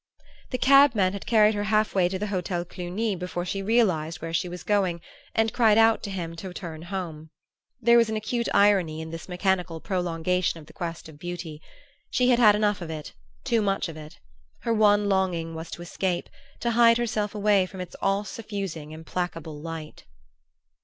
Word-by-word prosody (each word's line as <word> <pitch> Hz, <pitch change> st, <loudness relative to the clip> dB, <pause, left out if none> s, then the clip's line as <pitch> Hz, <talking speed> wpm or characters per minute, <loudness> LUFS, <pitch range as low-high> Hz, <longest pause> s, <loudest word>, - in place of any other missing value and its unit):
The 255 Hz, -, -2 dB
cabman 260 Hz, -9 st, +5 dB
had 200 Hz, -, -7 dB
carried 215 Hz, -2 st, +5 dB
her 205 Hz, 0 st, -2 dB
half 215 Hz, 0 st, +2 dB
way 180 Hz, -2 st, +3 dB
to 190 Hz, -, -3 dB
the 205 Hz, -, -3 dB
Hotel 180 Hz, -1 st, -2 dB
Cluny 185 Hz, +5 st, -3 dB
before 180 Hz, -1 st, -4 dB
she 195 Hz, +2 st, -3 dB
realized 190 Hz, -8 st, +1 dB
where 165 Hz, 0 st, -6 dB
she 175 Hz, +2 st, 0 dB
was 180 Hz, 0 st, -7 dB
going, 190 Hz, -5 st, +1 dB, 0.4 s
and 225 Hz, 0 st, +2 dB
cried 220 Hz, -3 st, +4 dB
out 225 Hz, 0 st, +5 dB
to -, -, -5 dB
him 170 Hz, -4 st, -4 dB
to 185 Hz, +2 st, -6 dB
turn 160 Hz, -4 st, -7 dB
home. 170 Hz, -4 st, -6 dB, 0.5 s
There 235 Hz, 0 st, +6 dB
was 230 Hz, -1 st, +3 dB
an 220 Hz, -, -2 dB
acute 225 Hz, +2 st, -2 dB
irony 195 Hz, -6 st, +3 dB
in 160 Hz, 0 st, -6 dB
this 165 Hz, +2 st, -8 dB
mechanical 180 Hz, -2 st, 0 dB
prolongation 180 Hz, -1 st, -1 dB
of 155 Hz, -, -13 dB
the 155 Hz, -, -16 dB
quest 170 Hz, -2 st, -5 dB
of 150 Hz, -2 st, -14 dB
beauty. 175 Hz, -3 st, -6 dB, 0.5 s
She 250 Hz, 0 st, +2 dB
had 245 Hz, -1 st, +4 dB
had 210 Hz, -4 st, +7 dB
enough 210 Hz, -2 st, +1 dB
of 170 Hz, -, -6 dB
it, 155 Hz, -2 st, -6 dB, 0.3 s
too 230 Hz, -, +1 dB
much 195 Hz, -2 st, 0 dB
of 165 Hz, -, -8 dB
it; 155 Hz, -1 st, -11 dB, 0.4 s
her 230 Hz, -, 0 dB
one 205 Hz, -1 st, +4 dB
longing 180 Hz, -4 st, 0 dB
was 160 Hz, +1 st, -7 dB
to 175 Hz, -, -7 dB
escape, 175 Hz, 0 st, -2 dB, 0.3 s
to 235 Hz, -, +1 dB
hide 230 Hz, 0 st, +6 dB
herself 215 Hz, -3 st, -1 dB
away 205 Hz, -2 st, +3 dB
from 190 Hz, -, -10 dB
its 180 Hz, -1 st, -7 dB
all 195 Hz, +1 st, +1 dB
suffusing 195 Hz, -9 st, -6 dB
implacable 160 Hz, -2 st, -5 dB
light. 160 Hz, -1 st, -8 dB
185 Hz, 190 wpm, -26 LUFS, 165-210 Hz, 0.5 s, had